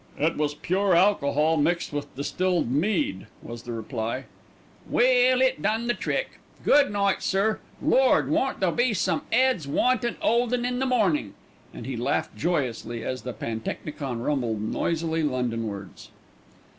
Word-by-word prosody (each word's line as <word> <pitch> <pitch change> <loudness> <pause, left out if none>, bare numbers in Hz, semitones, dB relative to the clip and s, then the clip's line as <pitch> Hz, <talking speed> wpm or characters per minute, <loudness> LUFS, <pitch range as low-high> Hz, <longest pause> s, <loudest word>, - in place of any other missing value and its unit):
"It 160 +3 +1
was 150 -1 -1
pure 190 +3 +1
alcohol 160 -4 +3
mixed 165 +2 0
with 145 0 -5
distilled 175 +1 0
mead," 145 - 0 0.2
was 120 0 -8
the 120 - -7
reply. 115 +2 -4 0.7
"Well, 255 0 +4
it 260 0 +1
done 220 +3 0
the 240 - +1
trick. - - -3 0.3
Good 285 -5 +5
night, 200 -1 +1
sir. 200 +3 +1 0.2
Lord! 260 - +4
won't 265 +7 0
there 185 -2 +3
be 240 +3 +1
some 180 -3 0
'eads 250 - +2
wantin' 240 - +1
'oldin' 240 +1 +1
in 250 0 -1
the 265 - 0
mornin'," 190 - +1 0.4
and - - -9
he 130 - -4
laughed 120 - -1
joyously 125 -8 -2
as 130 -1 -3
the 125 - -5
pantechnicon 115 +3 -5
rumbled 120 -7 -1
noisily 165 +7 -1
Londonwards. 115 - -3
165 Hz, 145 wpm, -25 LUFS, -, 0.7 s, Good